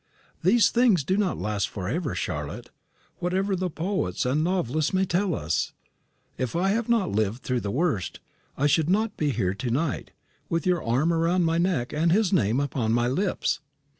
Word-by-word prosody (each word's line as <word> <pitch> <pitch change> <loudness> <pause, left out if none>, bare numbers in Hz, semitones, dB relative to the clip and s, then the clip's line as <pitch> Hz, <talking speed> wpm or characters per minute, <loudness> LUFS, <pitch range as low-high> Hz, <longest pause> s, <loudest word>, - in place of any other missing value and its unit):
These 215 +6 +4
things 230 - +4
do 185 - 0
not 200 -3 0
last 105 -2 -1
for 95 -3 -5
ever, 145 - -2
Charlotte, 90 - -4 0.5
whatever 190 +3 0
the 185 0 -1
poets 165 - -2
and 140 +5 +1
novelists 160 -3 0
may 190 +1 +3
tell 180 -1 0
us. 80 -4 -1 0.7
If 130 +1 -2
I 185 +3 +2
had 225 +3 0
not 230 -5 +2
lived 110 +3 -1
through 125 -1 0
the 105 - -4
worst, 125 - -1 0.4
I 140 - +1
should 155 +2 +3
not 215 +3 +1
be 150 - 0
here 95 -9 0
to 120 +5 -4
night, 140 +5 -1 0.4
with 165 +3 -1
your 180 -3 +1
arm 135 +9 +2
round 170 +2 +2
my 165 +1 +1
neck 170 -8 0
and 165 +3 +2
his 200 0 +2
name 120 - +2
upon 125 -5 0
my 120 0 +2
lips. 180 +10 0
165 Hz, 185 wpm, -26 LUFS, 120-185 Hz, 0.7 s, These